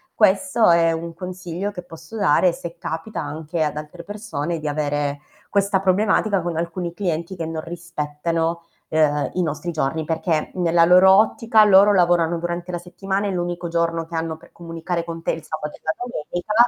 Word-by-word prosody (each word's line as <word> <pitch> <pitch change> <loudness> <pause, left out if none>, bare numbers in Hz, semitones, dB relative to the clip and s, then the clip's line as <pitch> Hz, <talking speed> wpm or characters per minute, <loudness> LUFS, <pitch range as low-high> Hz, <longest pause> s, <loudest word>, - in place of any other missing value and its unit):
Questo 225 +2 +4
è 170 -1 +5
un 165 +1 -4
consiglio 180 +2 -5
che 185 -3 -7
posso 165 +3 -12
dare 180 -2 +4
se 170 0 -8
capita 165 +5 -5
anche 155 +2 -3
ad 150 -1 -1
altre 155 +3 -8
persone 175 -5 -4
di 155 - -4
avere 145 -1 -1 0.3
questa 200 -1 +2
problematica 195 +1 +2
con 175 -1 -2
alcuni 170 +1 -3
clienti 175 -1 -2
che 165 -2 -4
non 160 -1 -4
rispettano, 165 0 -3 0.3
uhm, 150 -2 +2
i 180 - 0
nostri 170 +1 -2
giorni, 160 0 -1
perché 160 0 -1
nella 170 -2 +3
loro 185 +2 +7
ottica, 220 +2 +4
loro 205 0 +7
lavorano 175 -2 +3
durante 175 +1 -4
la 175 - -2
settimana, 195 +3 -3
e 200 - -1
l'unico 175 -1 -3
giorno 165 0 0
che 165 - -8
hanno 160 -1 -2
per - - -19
comunicare 170 0 -4
con 165 -1 -7
te - - +1
è - - -2
il 160 - -10
sabato 155 -1 -5
e - - -38
la 160 - 0
domenica, 195 -5 -4
170 Hz, 185 wpm, -22 LUFS, 160-185 Hz, 0.3 s, loro